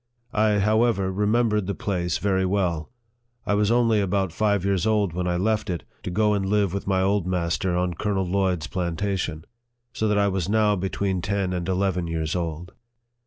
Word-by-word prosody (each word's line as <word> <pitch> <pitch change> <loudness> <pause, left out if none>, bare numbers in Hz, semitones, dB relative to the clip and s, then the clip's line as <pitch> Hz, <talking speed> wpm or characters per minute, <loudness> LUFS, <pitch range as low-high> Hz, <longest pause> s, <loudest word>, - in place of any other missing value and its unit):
I, 105 -1 +3
however, 105 -1 +2
remembered 105 0 +1
the 100 - -2
place 90 -4 -1
very 95 -1 +1
well. 90 -5 0 0.6
I - - +1
was 105 0 +2
only 115 -2 +3
about 95 -2 0
five 100 -1 +1
years 100 -1 +1
old 105 -5 +1
when 90 +1 -2
I 90 0 0
left 110 +3 0
it, 85 -3 -3 0.2
to - - -5
go 105 +3 +2
and 100 -1 0
live 100 -1 +1
with 100 - -4
my 95 -1 +2
old 100 -2 +1
master 90 0 0
on 90 0 0
Colonel 95 +1 -1
Lloyd's 90 -3 0
plantation; 85 -2 -2 0.5
so 110 - -1
that 105 -1 +2
I 100 0 +3
was 95 -2 -1
now 105 -1 +3
between 95 0 -2
ten 100 0 -1
and 90 0 -3
eleven 95 -2 0
years 80 -1 -2
old. 85 +1 -4
95 Hz, 185 wpm, -24 LUFS, 90-105 Hz, 0.6 s, I